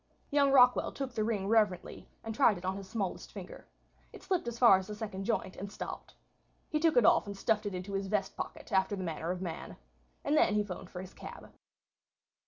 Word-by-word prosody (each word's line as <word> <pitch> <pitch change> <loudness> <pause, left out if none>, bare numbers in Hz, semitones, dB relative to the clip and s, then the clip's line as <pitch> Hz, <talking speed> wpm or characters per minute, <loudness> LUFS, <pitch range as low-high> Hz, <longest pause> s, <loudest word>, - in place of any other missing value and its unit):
Young 285 -1 +4
Rockwall 250 -2 +5
took 270 -3 -4
the 220 - 0
ring 210 -3 -1
reverently 210 -4 +1
and 225 - -4
tried 215 -2 +4
it 175 - -8
on 190 +1 -1
his 195 -1 -8
smallest 200 -4 -3
finger. - - -10 0.4
It - - -12
slipped 365 -9 -1
as 235 0 -4
far 235 -6 +7
as 190 - -8
the 210 - -6
second 200 -3 -5
joint 190 -4 -1
and 200 +1 -7
stopped. - - -7 0.5
He 305 - 0
took 315 -4 +3
it 240 - +6
off - - +5
and 200 -1 -6
stuffed 210 +1 +1
it 200 - -4
into 185 +2 -5
his 195 0 -1
vest 205 0 -1
pocket, - - -7
after 190 +1 +2
the 190 - -4
manner 165 -1 -3
of 180 +1 -2
man. 165 -3 -6 0.5
And 290 - +1
then 210 -8 +4
he 210 - +3
'phoned 185 -2 -7
for 180 - -7
his 190 0 -10
cab. - - -10
205 Hz, 220 wpm, -32 LUFS, 190-230 Hz, 0.5 s, far